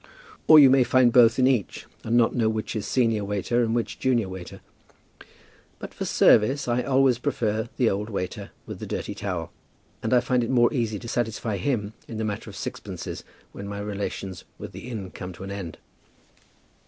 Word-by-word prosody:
Or 155 Hz, -, +9 dB
you 140 Hz, -3 st, +9 dB
may 135 Hz, -1 st, +5 dB
find 125 Hz, -1 st, +4 dB
both 120 Hz, -1 st, +6 dB
in 130 Hz, -, +4 dB
each, 130 Hz, -6 st, 0 dB, 0.2 s
and 115 Hz, +2 st, +1 dB
not 115 Hz, -1 st, +3 dB
know 115 Hz, -3 st, +2 dB
which 110 Hz, +1 st, -3 dB
is 105 Hz, -, -3 dB
senior 115 Hz, -5 st, +1 dB
waiter 105 Hz, +4 st, 0 dB
and 115 Hz, 0 st, 0 dB
which 120 Hz, -, -2 dB
junior 120 Hz, -6 st, +1 dB
waiter. 95 Hz, -1 st, -9 dB, 1.2 s
But -, -, -9 dB
for -, -, -4 dB
service 130 Hz, +6 st, +4 dB
I 120 Hz, +1 st, +1 dB
always 130 Hz, -2 st, +3 dB
prefer 110 Hz, -5 st, -1 dB
the 125 Hz, -, +3 dB
old 105 Hz, +1 st, -1 dB
waiter 100 Hz, 0 st, -4 dB, 0.2 s
with -, -, -8 dB
the -, -, -6 dB
dirty -, -, -4 dB
towel, 95 Hz, -5 st, -4 dB, 0.5 s
and 110 Hz, -, -2 dB
I 125 Hz, -, +6 dB
find 125 Hz, 0 st, +1 dB
it 115 Hz, -, -3 dB
more 120 Hz, 0 st, +3 dB
easy 115 Hz, -5 st, -1 dB
to 120 Hz, -, -9 dB
satisfy 110 Hz, -3 st, -2 dB
him 105 Hz, -2 st, -2 dB
in 115 Hz, -, -7 dB
the 110 Hz, -, -2 dB
matter 105 Hz, -2 st, -4 dB
of -, -, -11 dB
sixpences -, -, -6 dB, 0.3 s
when 100 Hz, -, -8 dB
my 100 Hz, 0 st, -5 dB
relations 100 Hz, -2 st, -5 dB
with -, -, -8 dB
the -, -, -9 dB
inn 100 Hz, -6 st, -6 dB
come 90 Hz, 0 st, -7 dB
to 90 Hz, -, -10 dB
an 100 Hz, -, -6 dB
end. 95 Hz, -5 st, -6 dB
115 Hz, 195 wpm, -25 LUFS, 100-125 Hz, 1.2 s, Or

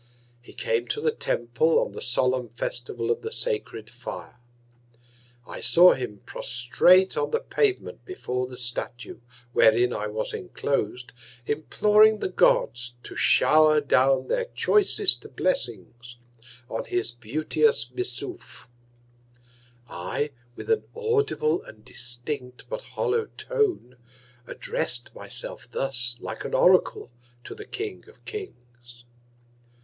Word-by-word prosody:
He 120 Hz, -, -15 dB
came 480 Hz, -2 st, -1 dB
to -, -, -2 dB
the 460 Hz, -, +1 dB
Temple 120 Hz, -, 0 dB
on -, -, 0 dB
the -, -, -8 dB
solemn 125 Hz, 0 st, +1 dB
Festival 120 Hz, 0 st, -4 dB
of -, -, -1 dB
the 445 Hz, -, -5 dB
sacred 425 Hz, -, -3 dB
Fire. 120 Hz, 0 st, -9 dB, 1.1 s
I -, -, -8 dB
saw 170 Hz, +9 st, +6 dB
him 105 Hz, -6 st, -6 dB
prostrate 175 Hz, +10 st, +3 dB
on 460 Hz, -, -1 dB
the 465 Hz, -, 0 dB
Pavement 430 Hz, -5 st, -1 dB
before 125 Hz, -, -4 dB
the 125 Hz, -1 st, -10 dB
Statue, 120 Hz, 0 st, -4 dB, 0.3 s
wherein 115 Hz, +3 st, +4 dB
I 105 Hz, -, -3 dB
was 110 Hz, +1 st, -4 dB
enclos'd, 125 Hz, -, -3 dB, 0.3 s
imploring 210 Hz, -, +3 dB
the 200 Hz, -, -3 dB
Gods 120 Hz, -8 st, +1 dB
to -, -, -9 dB
show'r 155 Hz, 0 st, +5 dB
down 135 Hz, -2 st, +2 dB
their -, -, 0 dB
choicest 420 Hz, -4 st, +2 dB
Blessings 120 Hz, -, -2 dB, 0.5 s
on 115 Hz, -, -4 dB
his 120 Hz, -1 st, -1 dB
beauteous 150 Hz, -, 0 dB
Missouf. 370 Hz, -1 st, -5 dB, 1.2 s
I, 145 Hz, +12 st, -3 dB, 0.2 s
with -, -, -5 dB
an 445 Hz, -, +3 dB
audible 450 Hz, -2 st, 0 dB
and -, -, -15 dB
distinct, 125 Hz, +1 st, -6 dB
but -, -, -4 dB
hollow 455 Hz, -2 st, -1 dB
Tone, 410 Hz, -, -1 dB, 0.5 s
address'd 120 Hz, 0 st, -2 dB
my -, -, -10 dB
self -, -, +3 dB
thus, 125 Hz, -3 st, 0 dB
like 110 Hz, -, -6 dB
an -, -, -3 dB
Oracle, 180 Hz, -8 st, +3 dB, 0.3 s
to -, -, -8 dB
the 425 Hz, -, -10 dB
King 415 Hz, -1 st, -6 dB
of -, -, -22 dB
Kings. 120 Hz, -, -10 dB
135 Hz, 125 wpm, -25 LUFS, -, 1.2 s, saw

